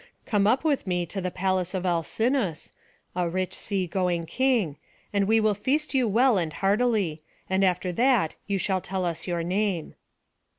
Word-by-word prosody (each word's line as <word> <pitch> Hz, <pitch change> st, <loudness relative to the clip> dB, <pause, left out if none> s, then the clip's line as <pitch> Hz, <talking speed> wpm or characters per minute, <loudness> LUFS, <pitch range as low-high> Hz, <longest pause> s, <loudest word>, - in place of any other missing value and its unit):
Come 205 Hz, -3 st, +2 dB
up 250 Hz, +7 st, +3 dB
with 290 Hz, -9 st, 0 dB
me 180 Hz, -1 st, 0 dB
to 195 Hz, +3 st, -5 dB
the 180 Hz, -, -1 dB
palace 185 Hz, 0 st, -1 dB
of 185 Hz, 0 st, -2 dB
Alcinous, 185 Hz, -, 0 dB, 0.4 s
the 180 Hz, -1 st, 0 dB
rich 185 Hz, +2 st, -2 dB
sea 195 Hz, -3 st, -2 dB
going 175 Hz, -1 st, -1 dB
king, 230 Hz, -, +1 dB, 0.4 s
and 200 Hz, -1 st, +2 dB
we 225 Hz, +1 st, +4 dB
will 215 Hz, -1 st, +3 dB
feast 275 Hz, +10 st, -1 dB
you 260 Hz, -3 st, +3 dB
well 230 Hz, +1 st, +4 dB
and 160 Hz, -3 st, -2 dB
heartily; 200 Hz, -6 st, +1 dB, 0.3 s
and 190 Hz, +1 st, +1 dB
after 180 Hz, -1 st, +1 dB
that 235 Hz, -4 st, +2 dB
you 200 Hz, -1 st, 0 dB
shall 190 Hz, 0 st, 0 dB
tell 190 Hz, 0 st, -3 dB
us 170 Hz, +1 st, -3 dB
your 170 Hz, -2 st, -1 dB
name." 185 Hz, -1 st, -1 dB
190 Hz, 175 wpm, -26 LUFS, 175-220 Hz, 0.4 s, we